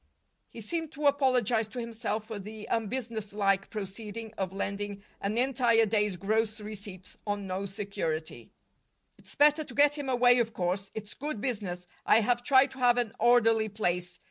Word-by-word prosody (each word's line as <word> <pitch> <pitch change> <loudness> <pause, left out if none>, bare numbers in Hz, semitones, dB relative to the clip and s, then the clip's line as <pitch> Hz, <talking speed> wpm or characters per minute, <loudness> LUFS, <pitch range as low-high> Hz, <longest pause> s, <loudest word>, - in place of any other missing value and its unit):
He 230 - -10
seemed 325 +7 -3
to 295 +1 -4
apologize 255 -6 +3
to 220 +4 -7
himself 225 -2 -3
for 220 -2 -6
the 215 +2 -8
unbusinesslike 215 -4 -1
proceeding 215 +2 -6
of 190 -2 -2
lending 200 +1 -4 0.2
an 205 +3 -1
entire 240 -3 +3
day's 210 -2 +1
gross 215 +3 0
receipts 200 -3 -9
on 205 -1 -2
no 190 +1 -3
security. 195 -6 -4 0.7
"It's - - -13
better 300 +1 +5
to 255 -5 -11
get 290 +1 +4
him 280 -2 -3
away, 245 -1 +5
of 230 -1 0
course. 190 +2 -2
It's 215 -1 -6
good 290 -5 -4
business. 200 -8 -3 0.2
I 225 - +5
have 240 +2 +1
tried 265 0 +5
to 265 - -11
have 245 -1 +4
an 240 -4 0
orderly 225 -2 +4
place. 180 -4 -2
220 Hz, 165 wpm, -29 LUFS, 200-245 Hz, 0.7 s, better